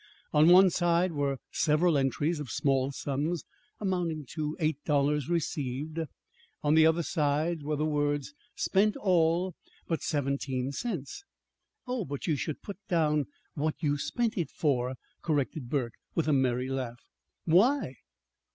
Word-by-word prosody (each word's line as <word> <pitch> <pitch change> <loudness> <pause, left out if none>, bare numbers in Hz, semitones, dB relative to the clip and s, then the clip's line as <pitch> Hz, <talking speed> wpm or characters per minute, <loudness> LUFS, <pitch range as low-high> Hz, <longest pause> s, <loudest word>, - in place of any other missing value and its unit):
On 150 +1 +6
the 175 - +8
one 185 0 +7
side 175 +1 +2
were 140 -3 -1
several 155 +2 +3
entries 145 +4 +1
of 145 -4 -6
small 135 +3 +1
sums, 145 +5 -2 0.4
amounting 175 -6 -1
to 155 0 -3
eight 155 -3 0
dollars 145 0 +1
received. 155 -2 -2 0.6
On 150 0 +3
the 160 0 +7
other 165 +1 +2
side 155 +1 0
were 150 +1 -1
the 150 +1 0
words: 145 -1 0 0.2
"Spent 205 +2 +2
all 175 -1 +2 0.3
but 165 - -1
seventeen 140 -3 -1
cents." 185 - -4 0.6
"Oh, 250 -3 -2
but 140 -4 -5
you 160 - +1
should 150 +1 -4
put 200 -2 -7
down 150 -4 +2 0.3
what 155 +1 -1
you 145 -1 +2
spent 230 - -1
it 160 -5 -1
for," 130 -5 0 0.3
corrected 145 -4 -1
Burke, 125 -5 -1 0.2
with 165 - +1
a 155 - +3
merry 130 -2 +1
laugh. 125 -3 -4 0.4
"Why?" 190 - +3
150 Hz, 145 wpm, -29 LUFS, 140-170 Hz, 0.6 s, the